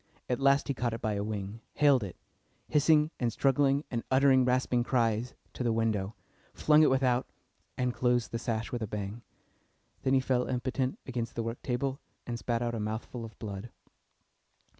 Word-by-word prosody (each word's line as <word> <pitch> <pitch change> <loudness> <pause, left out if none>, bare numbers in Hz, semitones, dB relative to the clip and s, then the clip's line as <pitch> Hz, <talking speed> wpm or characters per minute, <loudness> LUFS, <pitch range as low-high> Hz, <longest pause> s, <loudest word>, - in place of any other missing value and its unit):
At 125 - -1
last 140 +1 +4
he 140 - 0
caught 120 -3 -1
it 115 - -8
by 110 - +1
a 100 0 -1
wing, 105 +1 -5
haled 140 -5 +4
it, 95 -4 -6 0.5
hissing 150 +1 +4
and 120 -2 +1
struggling 140 +3 +2
and 115 -2 -2
uttering 130 -1 +5
rasping 125 -1 +2
cries, 120 -1 0 0.2
to - - -7
the 120 -2 +2
window, 110 -3 0 0.4
flung 150 0 +5
it 155 - +6
without, 130 -1 +2 0.5
and 125 -1 0
closed 125 -1 +1
the 115 - -2
sash 115 -1 -2
with 120 - -3
a 110 - -2
bang. 105 +2 -5 0.8
Then 135 0 +2
he - - +5
fell 130 -1 0
impotent 130 +1 -1
against 120 -3 -4
the 115 - -1
work 115 +1 -4
table, 135 +2 -2 0.3
and 120 -1 -4
spat 120 0 -1
out 120 0 -1
a 115 - -2
mouthful 110 +3 -4
of 115 -1 -10
blood. 100 +1 -6
120 Hz, 180 wpm, -30 LUFS, 115-130 Hz, 0.8 s, it